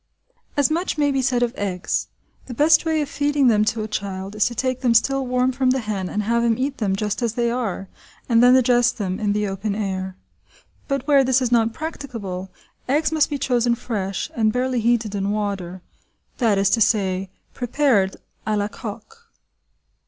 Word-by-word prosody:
As 285 Hz, +1 st, +3 dB
much 340 Hz, +1 st, -1 dB
may 290 Hz, -1 st, +2 dB
be 270 Hz, -1 st, +1 dB
said 250 Hz, -1 st, +1 dB
of 240 Hz, 0 st, -1 dB
eggs; 185 Hz, -3 st, -2 dB, 0.4 s
the 245 Hz, -, -7 dB
best 310 Hz, +5 st, +4 dB
way 320 Hz, -1 st, +1 dB
of -, -, -6 dB
feeding 285 Hz, -2 st, +2 dB
them 210 Hz, -2 st, +3 dB
to 220 Hz, 0 st, -1 dB
a -, -, -4 dB
child 195 Hz, -2 st, -4 dB
is 210 Hz, -, +2 dB
to 240 Hz, -, -5 dB
take 255 Hz, +1 st, -1 dB
them 240 Hz, -3 st, +2 dB
still 270 Hz, +3 st, +2 dB
warm 250 Hz, +1 st, +1 dB
from 260 Hz, 0 st, +1 dB
the 260 Hz, -, +2 dB
hen 200 Hz, -4 st, -3 dB
and 210 Hz, -, -2 dB
have 235 Hz, +2 st, +1 dB
him 230 Hz, -1 st, +2 dB
eat 275 Hz, +1 st, -2 dB
them 200 Hz, -4 st, 0 dB
just 210 Hz, +3 st, -2 dB
as 235 Hz, -2 st, 0 dB
they 235 Hz, -1 st, +1 dB
are, 220 Hz, -6 st, -3 dB, 0.4 s
and 230 Hz, -2 st, +4 dB
then 250 Hz, +1 st, +7 dB
digest 245 Hz, -2 st, +3 dB
them 190 Hz, -4 st, -3 dB
in 210 Hz, -1 st, 0 dB
the 210 Hz, 0 st, 0 dB
open 200 Hz, +1 st, -3 dB
air. 190 Hz, -2 st, -3 dB, 0.7 s
But 275 Hz, -2 st, -2 dB
where 280 Hz, -2 st, +5 dB
this 260 Hz, 0 st, +3 dB
is 250 Hz, -2 st, -1 dB
not 230 Hz, -1 st, +3 dB
prac 320 Hz, +5 st, -5 dB
ticable, 195 Hz, -8 st, -6 dB, 0.4 s
eggs 300 Hz, +3 st, +2 dB
must 315 Hz, -2 st, +2 dB
be 290 Hz, -, -2 dB
chosen 245 Hz, -3 st, +1 dB
fresh, 200 Hz, -5 st, -4 dB
and 220 Hz, -2 st, +2 dB
barely 250 Hz, +1 st, 0 dB
heated 230 Hz, -2 st, +1 dB
in 200 Hz, -1 st, -1 dB
water, 195 Hz, -4 st, -3 dB, 0.6 s
that 225 Hz, -5 st, +3 dB
is 195 Hz, 0 st, +2 dB
to 225 Hz, -, +2 dB
say, 195 Hz, -3 st, +1 dB, 0.2 s
prepared 245 Hz, -6 st, +1 dB, 0.3 s
à 215 Hz, -1 st, +1 dB
la 205 Hz, 0 st, -1 dB
coque. 455 Hz, -, -10 dB
235 Hz, 200 wpm, -22 LUFS, 205-260 Hz, 0.7 s, then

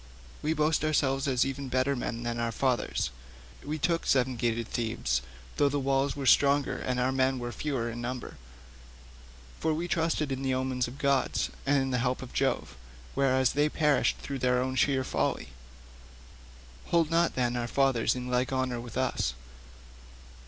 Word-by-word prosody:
We 155 Hz, +2 st, +1 dB
boast 155 Hz, +1 st, +1 dB
ourselves 140 Hz, -3 st, +1 dB
as 130 Hz, -2 st, +2 dB
even 135 Hz, 0 st, -4 dB
better 130 Hz, +2 st, +1 dB
men 120 Hz, -1 st, -4 dB
than 120 Hz, 0 st, -2 dB
our 115 Hz, 0 st, 0 dB
fathers; 125 Hz, -, 0 dB, 0.5 s
we 150 Hz, +2 st, -3 dB
took 165 Hz, +2 st, 0 dB
seven 130 Hz, -1 st, +2 dB
gated 115 Hz, -1 st, -1 dB
Thebes, 110 Hz, -, -1 dB, 0.4 s
though 145 Hz, -, +4 dB
the 145 Hz, +1 st, -1 dB
wall 135 Hz, +1 st, +1 dB
was 135 Hz, -3 st, +4 dB
stronger 140 Hz, 0 st, +3 dB
and 125 Hz, -1 st, -2 dB
our 125 Hz, +1 st, +2 dB
men 130 Hz, 0 st, +2 dB
were 120 Hz, -1 st, -4 dB
fewer 130 Hz, -4 st, -2 dB
in 120 Hz, 0 st, -5 dB
number, 125 Hz, +1 st, -5 dB, 1.2 s
for 160 Hz, -1 st, +1 dB
we 170 Hz, +3 st, -2 dB
trusted 160 Hz, -4 st, 0 dB
in 135 Hz, 0 st, -2 dB
the 130 Hz, -1 st, 0 dB
omens 130 Hz, -1 st, -1 dB
of 125 Hz, +3 st, -9 dB
the -, -, -11 dB
gods 140 Hz, -2 st, +1 dB, 0.2 s
and 140 Hz, 0 st, +4 dB
in 135 Hz, 0 st, -1 dB
the 125 Hz, -, +1 dB
help 125 Hz, +2 st, -1 dB
of 125 Hz, -, -10 dB
Jove, -, -, 0 dB, 0.4 s
whereas 130 Hz, -2 st, +2 dB
they 145 Hz, +1 st, +2 dB
perished 150 Hz, -2 st, +2 dB
through 140 Hz, -1 st, -5 dB
their 125 Hz, 0 st, +2 dB
own 130 Hz, +1 st, -1 dB
sheer 130 Hz, +1 st, +2 dB
folly; 130 Hz, -, -1 dB, 1.4 s
hold 165 Hz, -2 st, +2 dB
not, 170 Hz, +1 st, +2 dB
then, 125 Hz, -1 st, 0 dB
our 120 Hz, -1 st, -1 dB
fathers 130 Hz, -3 st, +2 dB
in 125 Hz, 0 st, -5 dB
like 125 Hz, +2 st, 0 dB
honour 130 Hz, -2 st, -1 dB
with 120 Hz, 0 st, -8 dB
us." 130 Hz, -, 0 dB
130 Hz, 175 wpm, -29 LUFS, 125-140 Hz, 1.4 s, though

